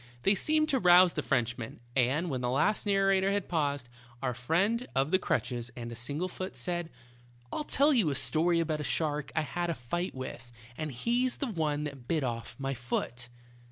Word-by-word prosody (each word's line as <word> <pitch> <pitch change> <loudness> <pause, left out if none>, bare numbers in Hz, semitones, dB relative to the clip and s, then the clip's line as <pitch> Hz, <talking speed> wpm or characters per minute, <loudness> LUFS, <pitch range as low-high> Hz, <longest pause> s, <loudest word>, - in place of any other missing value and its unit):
They 195 - +5
seemed 310 - +2
to 265 - +2
rouse 180 -2 +7
the - - -1
Frenchman, 120 0 -1 0.2
and 140 +7 +2
when 130 -2 -2
the 125 - 0
last 150 - +1
narrator 195 -1 +3
had 200 -1 -1
paused, 145 -6 -1 0.4
our 125 -2 0
friend 190 - +1
of 135 +3 +2
the 185 - +4
crutches 120 -8 -1
and 120 -1 -6
single 145 +9 -2
foot 185 +1 -6
said: 175 -2 -2 0.6
"I'll - - -1
tell 295 +1 +4
you 220 - +3
a 140 - -1
story 160 +8 +2
about 155 -2 -1
a - - -3
shark 150 -1 -1
I 155 - +3
had 175 +3 -2
a 170 - 0
fight 175 +9 -3
with, 130 -1 -7 0.2
and 155 +1 -4
he's 240 - 0
the - - -2
one 150 -5 -1
that 140 -5 -7
bit 160 -4 +1
off 115 -2 -4
my 135 0 -2
foot." 120 0 -3
155 Hz, 195 wpm, -30 LUFS, 130-185 Hz, 0.6 s, rouse